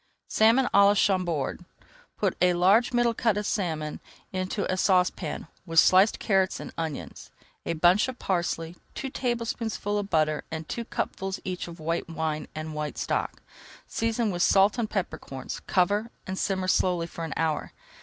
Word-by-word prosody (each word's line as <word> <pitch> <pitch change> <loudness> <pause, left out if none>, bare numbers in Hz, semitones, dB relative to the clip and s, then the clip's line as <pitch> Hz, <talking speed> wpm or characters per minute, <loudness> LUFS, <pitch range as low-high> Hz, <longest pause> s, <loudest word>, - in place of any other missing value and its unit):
SALMON 230 +4 +4
À 200 - +7
LA 205 - +4
CHAMBORD 180 -7 0 0.5
Put - - 0
a 180 -1 +4
large 200 +8 +4
middle 240 -1 +2
cut 225 -3 +1
of 210 - -2
salmon 160 -7 -2 0.3
into 185 +2 -2
a 185 - 0
saucepan 180 -4 +1 0.2
with 165 -1 +3
sliced 190 +5 +5
carrots 190 -3 +1
and - - -8
onions, 160 -3 -5 0.4
a - - +1
bunch 175 +7 +4
of 260 -1 -6
parsley, 170 -4 -2 0.2
two 270 -2 -4
tablespoonfuls 230 -4 -2
of 200 -1 -4
butter 155 -3 +1
and 160 -1 -5
two 235 - -4
cupfuls 195 -3 -3
each 185 -2 -4
of 170 0 -10
white 165 +2 -2
wine 160 -1 -2
and 155 0 -5
white 150 -1 -4
stock. - - -2 0.4
Season 230 -1 -1
with 175 -1 -3
salt 200 +6 +4
and 220 -2 -1
pepper 195 -4 -2
corns, 135 -1 -7
cover, 205 +5 +2 0.2
and 190 0 -4
simmer 190 -2 -1
slowly 180 -2 +2
for 170 0 -7
an 160 - -4
hour. 160 -2 -1
185 Hz, 165 wpm, -27 LUFS, 165-210 Hz, 0.5 s, À